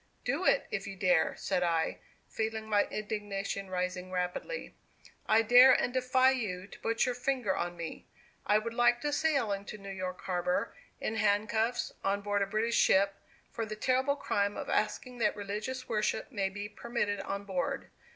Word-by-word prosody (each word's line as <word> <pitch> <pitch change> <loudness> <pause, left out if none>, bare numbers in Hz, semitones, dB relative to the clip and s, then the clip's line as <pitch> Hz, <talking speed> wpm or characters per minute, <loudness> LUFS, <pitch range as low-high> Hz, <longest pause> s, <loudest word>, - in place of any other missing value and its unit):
"Do - - 0
it, - - +4
if - - -3
you 195 - -6
dare," 180 -3 +2
said 185 -2 -1
I, 165 -2 0 0.3
feeling 220 0 -3
my 205 -1 +3
indignation 205 -2 -4
rising 180 0 -2
rapidly. 180 - -3 0.6
"I 225 +1 +5
dare 250 +3 +8
and 245 - +1
defy 255 0 +4
you 195 -8 -3
to 200 - -13
put 230 0 +1
your 250 - 0
finger 245 -5 0
on 175 0 -3
me. 165 -1 -7 0.4
I 210 - +4
would 230 +2 -3
like 240 0 +3
to 295 0 -1
sail 280 -9 +1
into 200 +1 -4
New 200 -1 -8
York 185 -1 -5
Harbor 180 -1 -1 0.3
in 220 - -2
handcuffs, 220 +3 +1
on 200 +1 +1
board 205 0 0
a 200 - +1
British 220 +3 0
ship, 195 +1 +4 0.4
for 230 - -3
the 215 -1 -4
terrible 260 +5 +1
crime 200 -7 0
of - - -5
asking 245 +3 -1
that 215 - +2
religious 215 +6 -4
worship 215 +2 -1
may 200 -5 0
be 205 +1 -5
permitted 210 -1 -2
on 200 0 -4
board. 190 -3 -3
210 Hz, 175 wpm, -31 LUFS, 195-240 Hz, 0.6 s, dare